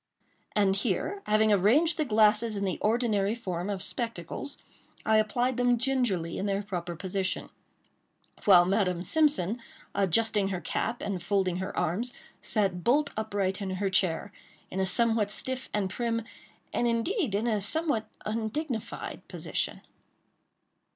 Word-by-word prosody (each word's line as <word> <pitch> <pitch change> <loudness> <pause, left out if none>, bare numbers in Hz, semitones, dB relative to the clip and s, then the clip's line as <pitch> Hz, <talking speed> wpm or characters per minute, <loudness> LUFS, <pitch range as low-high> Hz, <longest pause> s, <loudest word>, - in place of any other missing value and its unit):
And 200 -2 +3
here, 240 - -1
having 215 0 +4
arranged 265 - +4
the 310 - +2
glasses 215 -1 +3
in 200 - -1
the 185 - -2
ordinary 215 -2 +1
form 185 -5 -4
of 195 -2 -1
spectacles, 230 - -4 0.5
I 220 0 +4
applied 240 +4 +1
them 245 -1 +3
gingerly 235 -10 0
in 200 - -1
their 200 0 -1
proper 175 -4 -4
position; 190 +2 -2 0.9
while 180 -3 +7
Madame 185 -2 +1
Simpson, 250 - +3 0.3
adjusting 200 +2 +2
her 190 -2 -2
cap, 225 +7 -3
and 195 -3 -3
folding 190 -3 0
her 190 0 -5
arms, 225 +10 -1 0.3
sat 195 -5 0
bolt 285 +4 +2
upright 200 -3 -2
in 195 - -3
her 195 +1 -1
chair, 185 -3 +1 0.4
in 190 - -3
a 190 - +2
somewhat 225 +1 +3
stiff 260 +4 -2
and 205 -2 0
prim, 230 +3 -2 0.5
and 240 - +1
indeed, 235 - 0
in 210 +3 0
a 215 -3 +1
somewhat 260 0 +1 0.2
undignified 225 +3 -4
position. - - -3
210 Hz, 140 wpm, -28 LUFS, 190-235 Hz, 0.9 s, while